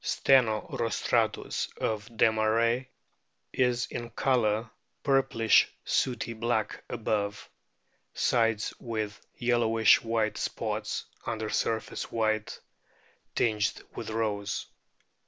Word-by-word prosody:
Steno 120 -6 +3
rostratus, 115 -1 0
of 110 0 -2
Desmarest,* 115 +2 +2 0.7
is 125 -1 +2
in 120 -1 -6
colour 115 -2 +1 0.3
purplish 135 -5 +4 0.2
sooty 120 -2 0
black 110 -1 -1
above, 105 -3 -2 0.6
sides 115 -3 +1
with 110 -3 -4
yellowish 115 -2 +4
white 115 -2 0
spots - - -3 0.2
under 110 -2 -2
surface 110 -1 -2
white, 110 -1 -1 0.8
tinged 105 -3 +1
with - - -6
rose. 105 -2 -2
115 Hz, 85 wpm, -29 LUFS, 110-120 Hz, 0.8 s, purplish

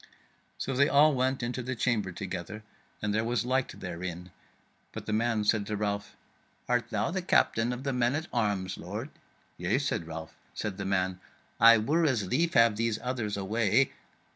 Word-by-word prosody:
So 135 - -3
they 140 +3 +3
all 150 0 +6
went 130 0 0
into 125 +2 -2
the 130 +1 -3
chamber 110 -5 0
together 95 +3 -6 0.4
and 105 0 0
there 110 +1 +1
was 120 -1 0
light 130 +1 -1
therein; 90 0 -6 0.6
but - - -7
the 110 - -2
man 115 -1 +1
said 105 -1 +2
to 105 - -2
Ralph: 100 -1 -3 0.5
"Art 125 -1 +1
thou - - -1
the 190 +1 -1
Captain 120 -9 +2
of 125 +1 -5
the 135 -1 -1
men 125 +1 +1
at 155 +2 -2
arms, 100 -5 -1
lord?" - - -6 0.5
"Yea," - - +1
said 80 - -2
Ralph. 80 -1 -7 0.2
Said 100 -3 -3
the 100 - -4
man, 95 -1 0 0.4
"I 115 +1 +9
were 150 +10 +1
as 125 -10 +2
lief 160 - 0
have 115 -2 +5
these 115 -1 0
others 120 -5 -2
away." 110 +5 +2
115 Hz, 180 wpm, -29 LUFS, 100-125 Hz, 0.6 s, I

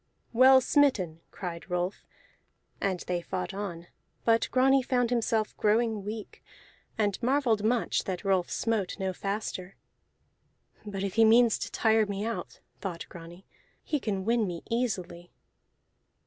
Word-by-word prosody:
"Well 260 +2 +7
smitten!" 215 - +2
cried 175 -1 -7
Rolf, 180 +2 -2 0.7
and 190 -3 -1
they 175 -1 -2
fought 180 +1 -4
on; 185 -4 -5 0.4
but 230 0 +3
Grani 270 +1 +4
found 245 -2 0
himself 225 -2 0
growing 220 -1 +1
weak, 215 +1 -7 0.5
and 205 -3 0
marvelled 245 -4 +2
much 235 +2 +1
that 185 +1 -4
Rolf 190 -2 +2
smote 220 -5 -1
no 190 -1 -2
faster. 195 -1 -4 1.1
"But 195 -1 -4
if 195 -2 -2
he 225 - +5
means 230 +1 +5
to - - -5
tire 220 -1 +3
me 200 +1 -3
out," 230 0 -5 0.2
thought 175 -4 -5
Grani, 175 +2 -11 0.4
"he 300 - -1
can 195 -6 -3
win 230 -1 +2
me 170 -2 -5
easily." 180 -8 -2
210 Hz, 135 wpm, -29 LUFS, 185-230 Hz, 1.1 s, Well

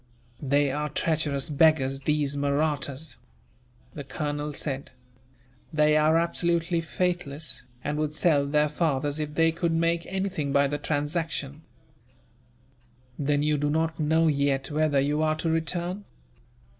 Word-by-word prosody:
"They 140 0 +2
are 150 +2 -2
treacherous 150 -2 0
beggars, 140 -3 +3
these 145 -1 0
Mahrattas," 145 0 -1 0.8
the 145 - -6
colonel 145 +2 -3
said. 140 -1 -4 0.8
"They 150 -1 +3
are 155 +1 +4
absolutely 170 0 +1
faithless, 160 -6 -2 0.2
and 150 +1 -2
would 155 0 -2
sell 150 -3 +2
their 150 +1 +2
fathers 145 -2 -1
if 150 -1 -4
they 165 +1 +4
could 170 0 -1
make 165 +1 +1
anything 190 -7 -2
by 140 +1 +4
the 145 +1 -2
transaction. 150 -1 -2 1.6
"Then 145 0 +1
you 150 -1 +1
do 145 0 0
not 160 +1 0
know 160 +2 +3
yet 140 -2 +1
whether 150 -2 +2
you 145 +3 +1
are 155 0 +2
to 160 +1 -1
return?" 175 +4 -2
150 Hz, 130 wpm, -26 LUFS, 145-160 Hz, 1.6 s, are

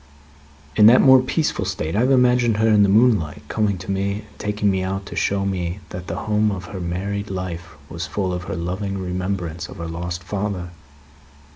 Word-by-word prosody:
"In 105 - +7
that 120 +3 +8
more 130 -1 +7
peaceful 140 -3 -1
state, 95 -3 -3
I - - +2
have 125 +3 +3
imagined 125 -3 +3
her, 110 +1 +3
in 105 -2 +5
the 100 - +5
moonlight, 105 - +3
coming 105 -3 0
to 90 +2 -6
me 100 +1 0 0.2
and - - -23
taking 105 -1 0
me 95 -1 0
out 95 +1 -3
to - - -8
show 100 0 0
me 90 -1 -2
that 90 0 -7
the - - -3
home 105 0 +2
of 95 -3 -4
her 95 +1 -7
married 100 +4 -3
life 90 -3 -5
was 85 +3 -5
full 95 -3 -2
of 90 0 -4
her - - -4
loving 95 +3 -3
remembrance 90 -2 -3
of - - -10
her 85 - -5
lost 85 +2 -5
father. 95 -2 -3
95 Hz, 200 wpm, -22 LUFS, 90-105 Hz, 0.2 s, that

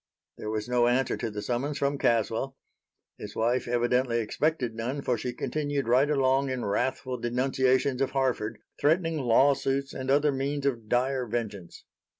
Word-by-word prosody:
There 105 - -5
was 110 0 -2
no 120 -1 +3
answer 125 +2 +1
to 115 - -3
the 105 -1 -6
summons 135 +4 -2
from 140 0 0
Caswell. 115 +4 0 0.6
His 105 0 -8
wife 120 +3 +1
evidently 120 0 +1
expected 125 +2 -1
none, 125 +5 -3
for 125 - +1
she 125 +2 -3
continued 140 +1 -2
right 130 +5 +4
along 135 -1 +2
in 130 -1 -2
wrathful 125 +4 -1
denunciations 130 +2 +1
of 135 - +2
Harford, 130 -5 -1 0.2
threatening 165 +1 +2
law 135 +2 +4
suits 135 0 -2
and 130 0 -5
other 145 +2 +4
means 140 +1 -2
of 115 -6 -1
dire 125 +1 +1
vengeance. 105 -6 -5
130 Hz, 160 wpm, -28 LUFS, 120-140 Hz, 0.6 s, right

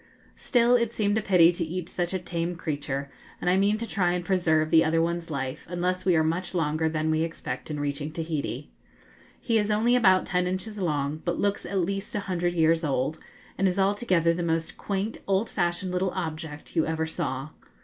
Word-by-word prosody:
Still 240 -1 +3
it 235 -2 +1
seemed 210 -3 +1
a - - -3
pity 180 -4 +6
to 175 0 -3
eat 170 +1 -4
such 175 -1 -2
a 190 - 0
tame 175 -1 -3
creature, 145 -4 -3 0.3
and 180 - +1
I - - +4
mean 200 +2 +3
to 230 - -4
try 180 -6 +1
and 175 0 -2
preserve 160 -5 +2
the 160 - +6
other 165 0 +2
one's 170 +1 -1
life, 135 0 -4
unless 180 +1 -1
we 180 -2 +4
are 160 - +4
much 170 +4 -2
longer 160 -1 +1
than 155 0 0
we 155 0 +1
expect 165 -6 -4
in 150 -1 -3
reaching 145 +1 -3
Tahiti. 155 -4 -4 0.7
He 230 -2 +1
is 210 0 0
only 225 +4 +3
about 190 -6 +5
ten 180 0 0
inches 195 +4 -4
long, 150 -3 -1
but - - -1
looks 200 0 -1
at 195 - -2
least 195 +3 -3
a 205 - 0
hundred 175 -2 -1
years 165 0 +3
old, 145 +1 -1 0.4
and 195 - +4
is 185 +1 0
altogether 190 -4 +2
the 175 - -3
most 165 0 -1
quaint, 200 +2 -3
old 195 +3 +1
fashioned 175 0 -1
little 180 +1 0
object 160 -4 -5
you 160 - +2
ever 160 0 -1
saw. 135 -3 -3
175 Hz, 205 wpm, -27 LUFS, 160-190 Hz, 0.7 s, pity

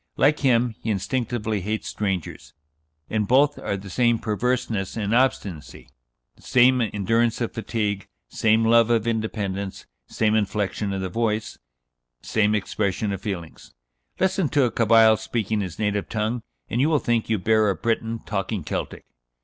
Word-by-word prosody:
Like 150 +2 +3
him, 125 -3 +2
he 110 - -4
instinctively 110 +1 -1
hates 105 +4 -3
strangers; 95 - -4 0.5
in 110 -1 0
both 140 +6 +3
are 100 - -2
the 95 0 -10
same 120 0 +3
perverseness 115 -2 -2
and 105 0 -1
obstinacy, 100 - -1 0.5
same 125 0 +4
endurance 115 +2 +1
of 120 - -2
fatigue, 105 -3 -2 0.2
same 110 0 +2
love 115 0 +5
of 115 -2 +2
independence, 105 -4 -3 0.2
same 110 -1 +1
inflexion 105 -1 -1
of 95 -1 -3
the 95 - -3
voice, 110 +1 -2 0.6
same 105 -1 +1
expression 100 0 -1
of 95 - -5
feelings. 90 -6 -7 0.4
Listen 190 -4 +1
to 145 +1 +3
a 120 - +1
Cabyle 110 -1 +5
speaking 110 -1 -2
his 90 -4 -5
native 105 -1 -1
tongue, 110 +2 -1 0.3
and 120 - -1
you 150 - +3
will 155 - +3
think 120 -4 0
you 110 - +2
bear 110 +2 +3
a 95 - 0
Breton 115 +1 -2
talking 100 -2 -3
Celtic." - - -5
110 Hz, 150 wpm, -24 LUFS, 100-115 Hz, 0.6 s, love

